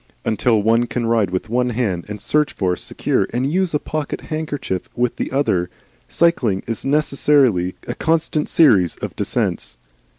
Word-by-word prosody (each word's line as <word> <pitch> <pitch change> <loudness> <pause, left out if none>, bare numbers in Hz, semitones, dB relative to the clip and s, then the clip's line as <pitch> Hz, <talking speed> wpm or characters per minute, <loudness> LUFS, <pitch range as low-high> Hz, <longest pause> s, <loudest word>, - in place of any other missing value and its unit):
Until 110 -1 +2
one 115 +2 +3
can 120 -1 -2
ride 115 -4 +2
with 95 +4 -3
one 125 +2 0
hand, 110 -8 -2
and 105 0 -6
search 150 +7 +1
for, 90 -2 0
secure, - - -1
and 130 +5 -1
use 185 -3 +1
a - - +2
pocket 155 0 -4
handkerchief 150 - -4
with 120 0 0
the - - -3
other, 95 -11 +1 0.4
cycling 125 - +1
is 115 -1 -4
necessarily 135 -9 +2
a - - -2
constant 160 -1 0
series 100 - +4
of - - -6
descents. - - -2
120 Hz, 160 wpm, -20 LUFS, 100-150 Hz, 0.4 s, series